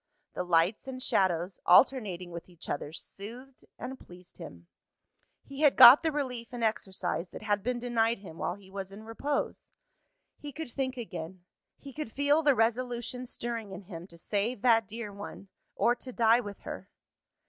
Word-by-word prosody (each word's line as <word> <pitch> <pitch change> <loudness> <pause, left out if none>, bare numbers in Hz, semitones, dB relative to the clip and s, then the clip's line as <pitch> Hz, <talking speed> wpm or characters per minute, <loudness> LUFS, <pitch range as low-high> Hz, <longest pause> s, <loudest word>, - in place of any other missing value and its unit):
The - - -2
lights 180 +7 +2
and 260 -1 -5
shadows, 185 -6 +1
alternating 185 -4 +4
with 170 +1 -8
each 175 -2 -10
other, 145 +1 -3
soothed 240 +10 -10
and 265 +1 -7
pleased 180 +1 -14
him. 85 - -10 0.8
He 275 +1 -8
had 295 -3 +5
got 250 +4 +11
the 325 -1 +1
relief 250 -6 -4
in 240 -2 -4
exercise 190 -5 -1
that - - -9
had 205 -1 +1
been 250 +3 -1
denied 235 -1 +1
him 180 -5 -11
while 175 - -1
he 195 -1 -17
was 195 -1 -6
in 205 +2 -10
repose. 275 +6 -3 0.7
He 290 - -7
could 305 -2 -7
think 260 -1 -2
again; 180 -5 -7 0.3
he 275 -1 -11
could 300 -6 -5
feel 285 +4 +3
the 290 -3 +4
resolution 240 +2 -1
stirring 230 -4 -4
in 190 +1 -8
him 175 -2 -9
to 170 - -13
save 205 +6 -2
that 225 -4 +4
dear 215 -1 -6
one, 200 -1 -9 0.3
or 240 - +3
to 255 +1 -8
die 230 -1 +4
with 205 -4 -7
her. - - -7
225 Hz, 175 wpm, -30 LUFS, 185-250 Hz, 0.8 s, got